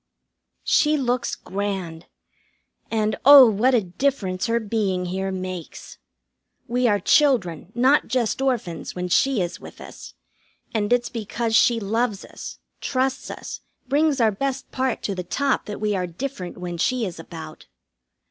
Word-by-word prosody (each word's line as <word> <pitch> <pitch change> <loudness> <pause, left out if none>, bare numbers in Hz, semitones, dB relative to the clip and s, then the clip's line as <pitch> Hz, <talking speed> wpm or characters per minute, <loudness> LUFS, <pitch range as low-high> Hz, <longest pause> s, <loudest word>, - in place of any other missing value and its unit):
She 305 0 +3
looks 250 -2 -1
grand. 190 -4 -4 0.8
And 215 -1 0
oh, 275 -1 +10
what 230 +5 +3
a 225 - +2
difference 185 0 -1
her 230 0 +1
being 205 -4 -1
here 190 +2 -2
makes! 185 -3 -7 0.7
We 245 +1 +1
are 205 -2 +2
children, 200 - +2
not 260 +4 +3
just 240 +1 0
orphans, 235 -11 -2
when 180 0 -3
she 245 +2 +3
is 175 0 -5
with - - -12
us; - - -11 0.6
and 210 -1 -1
it's 245 -1 +2
because 230 0 -2
she 235 0 +4
loves 220 0 -1
us, - - -9 0.2
trusts 260 0 -1
us, - - -7 0.3
brings 290 +1 +2
our 225 -2 +4
best 270 +5 -3
part 260 0 -1
to 200 - -1
the 180 -1 -4
top 275 +10 -1
that 210 - -5
we 210 -1 0
are 180 -1 -1
different 185 0 -6
when 175 -1 -5
she 250 +4 +1
is 175 -4 -6
about. 165 0 -10
220 Hz, 150 wpm, -23 LUFS, 185-255 Hz, 0.8 s, oh